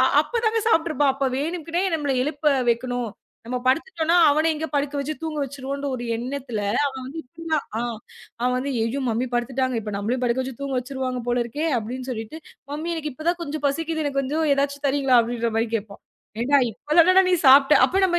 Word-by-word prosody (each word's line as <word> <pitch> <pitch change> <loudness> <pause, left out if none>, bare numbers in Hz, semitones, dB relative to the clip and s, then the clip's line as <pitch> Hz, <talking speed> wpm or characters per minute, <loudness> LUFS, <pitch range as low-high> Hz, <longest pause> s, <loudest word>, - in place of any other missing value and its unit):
அ. - - +6 0.2
அப்பதாங்க 450 +5 0
சாப்பிட்டுருப்பான். 315 -7 +2
அப்ப 275 0 -1
வேணுக்கினே 330 +4 -2
நம்மள 290 -4 0
எழுப்ப 295 +1 +1 0.2
வெக்கணும், 245 0 0 0.4
நம்ம 250 +2 -2
படுத்துட்டோன்னா, 330 +4 +2
அவன 310 +3 +2
இங்க 315 +1 -3
படுக்க 285 0 0
வச்சு 295 +3 -3
தூங்க 315 -2 -3
வச்சிருவோன்ற 280 +1 -5
ஒரு 240 - -6
எண்ணத்துல, 250 -1 -4 0.3
அவன் 265 -2 -5
வந்து 285 +5 -7
இப்படிதான் 315 +3 -3 0.2
அ. - - -1 0.6
அவன் 250 0 +2
வந்து 275 +2 -2
ஐயோ 230 +5 -1
மம்மி 235 +3 -1
படுத்துட்டாங்க. 255 +1 0
இப்ப 210 0 -5
நம்மளையும் 230 +6 -2
படுக்க 245 +2 +1
வச்சு 260 -2 -7
தூங்க 275 -2 -2
வச்சிருவாங்க 255 -1 -4
போல 245 0 +2
இருக்கே 290 +7 -3
அப்படின்னு 250 +4 -6
சொல்லிட்டு 225 +5 -5 0.3
ம்ம்மி 325 +3 -3
எனக்கு 305 -3 -4
இப்பதான் 340 +5 -1
கொஞ்சம் 300 -2 -5
பசிக்குது 320 +2 -2
எனக்குக் 275 -1 0
கொஞ்சம் 305 +4 0
எதாச்சு 280 0 -1
தரீங்களா 270 -2 +3
அப்படின்ற 235 0 -2
மாரி 225 +1 +1
கேப்பான். 205 -2 -9 0.4
ஏன்டா 280 +4 +4
இப்பதானடா 335 - +4
நீ - - +5
சாப்ட, 275 +2 +7
அப்ப 375 - -3
நாம 345 -1 +1
275 Hz, 180 wpm, -23 LUFS, 250-310 Hz, 0.6 s, சாப்ட